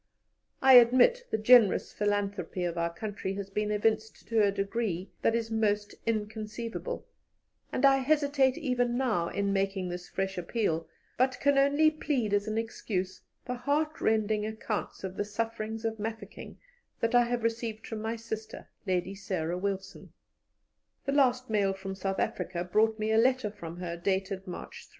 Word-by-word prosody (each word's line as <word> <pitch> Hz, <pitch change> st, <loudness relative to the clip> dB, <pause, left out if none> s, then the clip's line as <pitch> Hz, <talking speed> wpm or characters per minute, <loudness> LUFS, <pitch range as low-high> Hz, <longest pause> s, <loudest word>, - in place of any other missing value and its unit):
I 265 Hz, 0 st, +8 dB
admit 255 Hz, -, +5 dB
the -, -, 0 dB
generous 220 Hz, -1 st, +5 dB
philanthropy 200 Hz, -3 st, -1 dB
of 175 Hz, -1 st, -1 dB
our 170 Hz, 0 st, -1 dB
country 195 Hz, +1 st, -4 dB
has 200 Hz, 0 st, -6 dB
been 210 Hz, +1 st, -1 dB
evinced 215 Hz, 0 st, -1 dB
to 225 Hz, -1 st, +3 dB
a 200 Hz, -, +4 dB
degree 195 Hz, -2 st, -2 dB
that 225 Hz, -, +2 dB
is 230 Hz, -1 st, -2 dB
almost 210 Hz, -2 st, 0 dB
inconceivable, 220 Hz, -, -3 dB, 0.7 s
and 265 Hz, -, +2 dB
I 270 Hz, 0 st, +6 dB
hesitate 280 Hz, -1 st, +2 dB
even 245 Hz, -5 st, 0 dB
now 225 Hz, -10 st, +1 dB
in 200 Hz, +1 st, -1 dB
making 195 Hz, -1 st, -1 dB
this 180 Hz, 0 st, -6 dB
fresh 190 Hz, -1 st, -2 dB
appeal, 170 Hz, -3 st, -1 dB, 0.3 s
but 260 Hz, 0 st, +2 dB
can 285 Hz, 0 st, +3 dB
only 285 Hz, +3 st, +4 dB
plead 270 Hz, -9 st, -1 dB
as 205 Hz, 0 st, +1 dB
an 215 Hz, 0 st, -2 dB
excuse 190 Hz, -4 st, -3 dB, 0.2 s
the 250 Hz, -, -3 dB
heartrending 245 Hz, -6 st, 0 dB
accounts 220 Hz, -1 st, -4 dB
of 190 Hz, 0 st, -5 dB
the -, -, +1 dB
sufferings 225 Hz, +1 st, -4 dB
of 220 Hz, -1 st, -2 dB
Mafeking 220 Hz, +1 st, -6 dB, 0.4 s
that 230 Hz, +1 st, 0 dB
I 245 Hz, 0 st, +6 dB
have 240 Hz, -1 st, -2 dB
received 230 Hz, -1 st, -2 dB
from 220 Hz, -2 st, -5 dB
my 225 Hz, +1 st, -2 dB
sister, 220 Hz, -1 st, -7 dB, 0.2 s
Lady 185 Hz, +1 st, 0 dB
Sarah 180 Hz, -4 st, -3 dB
Wilson. 195 Hz, 0 st, -4 dB, 0.9 s
"The 275 Hz, -, 0 dB
last 255 Hz, -3 st, +3 dB
mail 205 Hz, -3 st, +1 dB
from 195 Hz, 0 st, -6 dB
South 195 Hz, 0 st, -3 dB
Africa 180 Hz, -1 st, -2 dB
brought 215 Hz, +4 st, +2 dB
me 215 Hz, 0 st, -1 dB
a 220 Hz, -, +4 dB
letter 255 Hz, -2 st, +2 dB
from 170 Hz, -5 st, -8 dB
her, 175 Hz, -1 st, -4 dB
dated 190 Hz, +1 st, -2 dB
March 180 Hz, -, -8 dB
3. -, -, -28 dB
215 Hz, 165 wpm, -29 LUFS, 195-235 Hz, 0.9 s, I